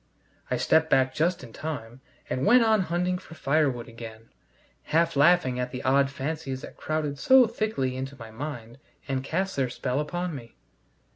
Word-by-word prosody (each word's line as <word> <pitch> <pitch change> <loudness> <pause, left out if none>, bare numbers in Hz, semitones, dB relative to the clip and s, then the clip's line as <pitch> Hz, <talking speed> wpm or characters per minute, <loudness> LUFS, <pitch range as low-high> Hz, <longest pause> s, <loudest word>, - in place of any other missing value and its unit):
I - - 0
stepped 160 0 +3
back 130 -2 +3
just 170 -1 0
in 115 -3 -11
time, 130 -6 -6 0.3
and 130 - -2
went 240 - +6
on 220 -2 +4
hunting 180 +1 -1
for 165 -3 -13
firewood 135 -6 +1
again, 115 -1 -10 0.6
half 165 +1 +2
laughing 140 -4 +4
at 125 0 -2
the 125 0 -6
odd 135 +1 +3
fancies 135 -1 -4
that - - -10
crowded 150 -2 -3
so 260 - +7
thickly 215 - -2
into 135 +1 -5
my 115 -3 -10
mind 120 -1 -7 0.3
and 135 -1 -1
cast 190 +7 -2
their 130 -2 0
spell 125 +2 -2
upon 175 +3 -3
me. 120 -5 -9
140 Hz, 170 wpm, -27 LUFS, 130-170 Hz, 0.6 s, so